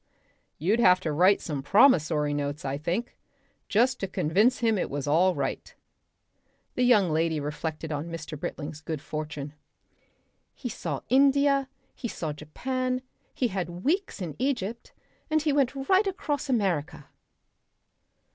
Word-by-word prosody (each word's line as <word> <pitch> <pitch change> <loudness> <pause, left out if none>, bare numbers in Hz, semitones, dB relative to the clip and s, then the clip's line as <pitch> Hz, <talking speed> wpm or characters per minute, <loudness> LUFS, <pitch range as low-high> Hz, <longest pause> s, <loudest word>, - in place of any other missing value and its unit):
"You'd 195 +10 +1
have 185 -5 +6
to 160 - -2
write 185 +6 +4
some 145 -4 -4
promissory 155 - +4
notes, 145 0 -3
I 135 0 -1
think 175 +11 -3 0.5
just 250 +4 +2
to 195 - -2
convince 195 +9 +2
him 225 -4 +1
it - - -1
was 140 -1 -3
all 175 +5 +3
right." - - -3 1.0
The - - -2
young 215 -8 +4
lady 160 0 +1
reflected 155 +2 -4
on 150 +2 -3
Mr. 160 -2 -6
Britling's 150 +1 -6
good 160 -2 -4
fortune. 150 -1 -6 1.0
"He 245 - -5
saw 155 -9 -4
India. 275 +1 +4 0.2
He 235 - -5
saw 160 -8 -4
Japan. 255 - -3 0.3
He 245 - +1
had 180 -2 -4
weeks 350 - 0
in 160 -4 -5
Egypt. 235 -4 -2 0.4
And 310 -1 +2
he 300 -2 +2
went 275 -1 +2
right 385 +2 +4
across 295 -7 -2
America." 175 - 0
180 Hz, 140 wpm, -27 LUFS, 155-255 Hz, 1.0 s, have